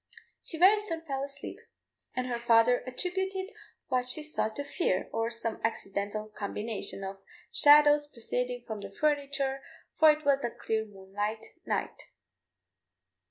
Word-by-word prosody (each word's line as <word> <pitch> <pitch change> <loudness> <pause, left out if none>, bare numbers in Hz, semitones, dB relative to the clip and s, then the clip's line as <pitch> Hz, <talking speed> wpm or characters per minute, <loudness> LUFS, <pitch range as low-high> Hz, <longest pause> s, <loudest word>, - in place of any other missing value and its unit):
She 325 - -6
very 385 +5 +7
soon 335 -6 -3
fell 270 -3 -2
asleep, 280 0 -7 0.6
and 255 - -1
her 240 -2 -2
father 235 +1 +5
attributed 380 - -3 0.4
what 250 -1 +1
she 300 +4 0
saw 300 -6 -1
to 250 +6 -5
fear, 280 - 0
or 225 0 0
some 230 -1 -4
accidental 210 -1 -2
combination 210 -1 -4
of 195 0 -6 0.3
shadows 295 0 +6
proceeding 245 -1 -2
from 220 -3 -5
the 200 -1 -7
furniture, 280 +2 0 0.4
for 315 - +8
it 305 0 +2
was 280 -1 +3
a 240 - 0
clear 220 -1 -2
moonlight 205 +2 -4 0.2
night. - - -2
250 Hz, 140 wpm, -30 LUFS, 220-295 Hz, 0.6 s, for